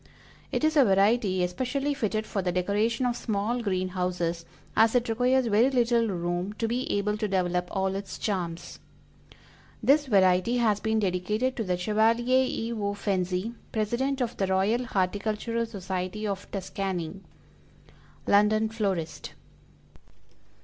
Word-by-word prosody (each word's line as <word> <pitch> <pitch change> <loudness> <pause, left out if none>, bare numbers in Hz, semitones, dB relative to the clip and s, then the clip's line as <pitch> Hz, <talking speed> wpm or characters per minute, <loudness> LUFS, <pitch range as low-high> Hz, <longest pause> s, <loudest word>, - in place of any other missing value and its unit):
It - - -1
is 310 0 +2
a 285 - +7
variety 195 -2 +3
especially 260 +10 -1
fitted 215 -4 -1
for 200 - -2
the 180 -1 -1
decoration 205 +7 0
of 245 -1 0
small 225 +2 -1
green 185 -4 -1
houses, 180 -2 -2 0.3
as 225 +2 +4
it 245 -1 +2
requires 250 +3 +2
very 225 +3 +4
little 235 -3 +2
room 175 +1 -2
to 225 +2 -2
be 245 +3 -2
able 210 +1 0
to 215 0 -1
develop 180 -2 0
all 190 0 -1
its 195 0 -5
charms. 175 -5 -4 1.0
This 290 +1 +4
variety 190 +1 +3
has 215 -4 +2
been 220 +1 0
dedicated 210 +6 0
to 225 - -2
the 180 -3 -1
Chevalier 230 +6 +2
E. 230 -1 -3
O. 205 -2 -2
FENZI, 190 +1 -1 0.2
President 240 +5 -1
of 240 -1 -1
the 195 - 0
Royal 200 +6 +1
Horticultural 215 +3 -1
Society 190 0 -4
of 200 -1 -4
Tuscany. 190 -2 -4 1.1
_London 215 +2 +3
Florist. 175 -8 -3
210 Hz, 140 wpm, -27 LUFS, 185-235 Hz, 1.1 s, a